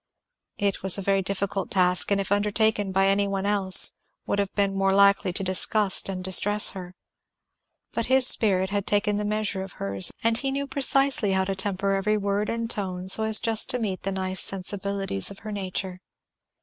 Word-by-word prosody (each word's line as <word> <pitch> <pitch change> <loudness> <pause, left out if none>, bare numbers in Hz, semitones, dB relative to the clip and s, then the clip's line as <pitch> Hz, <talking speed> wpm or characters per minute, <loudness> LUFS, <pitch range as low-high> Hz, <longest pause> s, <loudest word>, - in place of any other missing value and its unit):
It 200 -2 -2
was 190 0 +5
a - - -5
very 195 0 0
difficult 195 +1 -4
task, 180 -1 0
and 200 -1 0
if 195 - -5
undertaken 205 0 -1
by 195 +1 +1
any 200 +1 0
one 195 0 -4
else 200 -2 +4 0.3
would 205 - -3
have 200 -1 -2
been 200 -1 0
more 195 0 0
likely 200 -1 +2
to 195 - -4
disgust 195 +2 +2
and 185 -1 -6
distress 205 +3 +5
her. 180 -1 -11 1.0
But 230 - -4
his 260 0 +4
spirit 190 -6 +3
had 200 -1 -3
taken 205 0 0
the 210 - -3
measure 210 -2 -3
of 190 0 -9
hers, 100 -1 0
and 230 0 +1
he 270 - -2
knew 280 +1 -4
precisely 270 -5 0
how 190 0 0
to 195 - -3
temper 195 0 -2
every 205 +2 -1
word 200 +1 -3
and 230 0 -4
tone 185 -4 -3
so 220 - +6
as 220 0 +4
just 225 -1 +3
to 250 - -2
meet 205 -6 -5
the 195 - -4
nice 190 0 -3
sensibilities 195 - -4
of 200 - -11
her 215 - -6
nature. 190 -2 -6
200 Hz, 195 wpm, -24 LUFS, 190-210 Hz, 1.0 s, so